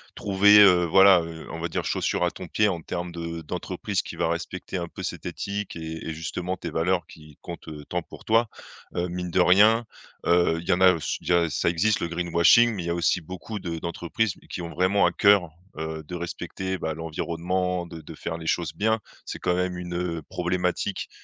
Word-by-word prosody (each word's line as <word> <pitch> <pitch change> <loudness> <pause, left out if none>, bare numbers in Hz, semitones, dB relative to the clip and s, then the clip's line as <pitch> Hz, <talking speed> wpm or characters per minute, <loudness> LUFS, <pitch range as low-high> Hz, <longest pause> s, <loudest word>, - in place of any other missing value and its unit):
trouver, 100 +1 +5
heu, 90 -3 +6
voilà, 95 +1 +7
heu, 80 -1 -8
on 80 - -6
va 85 - -2
dire: 80 - -3
«chaussure - - 0
à 85 - 0
ton 90 - -9
pied,» 105 +4 +2
en 85 -4 -2
termes 90 +1 -4
de 85 -1 -5
d'entreprise 75 - -3
qui - - -9
va - - 0
respecter 90 +3 -4
un 85 -1 -3
peu - - -9
cette - - -5
éthique 100 0 -4
et 80 -1 -6
et 80 - -2
justement 90 +3 -4
tes 85 - -6
valeurs 85 +1 0
qui 75 -2 -15
comptent, 85 -1 -9
heu, 75 -2 -8
tant 90 - -2
pour - - -14
toi. 115 0 +3 0.5
Heu, 90 +1 -1
mine 90 0 -4
de 90 - +1
rien, 105 +6 +5 0.4
heu, 85 -1 +3
il 85 - -10
y - - +2
en 90 - 0
a 95 -1 +7
s 80 - -3
il - - -12
y - - +3
a 85 -2 +2
ça 70 - +1
existe 100 +5 +2
le - - -2
greenwashing 85 +7 +4
mais 95 - -4
il 85 - -5
y - - -1
a 85 - 0
aussi 85 +1 +1
beaucoup 95 +6 -7
de 85 -3 -4
d'entreprises 85 +5 -2 0.2
qui 90 - -5
ont 85 - -5
vraiment 95 +1 +3
à 85 - +3
cœur, 100 -4 +4 0.3
heu, 80 0 -4
de 85 +4 -7
respecter, 95 +2 -4
bah, 80 0 -3
l'environnement 85 +3 -2
de 85 -1 -9
de 75 - -11
faire 80 - -5
les 80 - -8
choses 85 0 0
bien. 110 +2 +1 0.3
C'est - - -5
quand 90 - 0
même 90 0 -1
une, 90 -1 -6
heu, 85 -3 -3
problématique 90 +2 -1
90 Hz, 225 wpm, -25 LUFS, 85-95 Hz, 0.5 s, voilà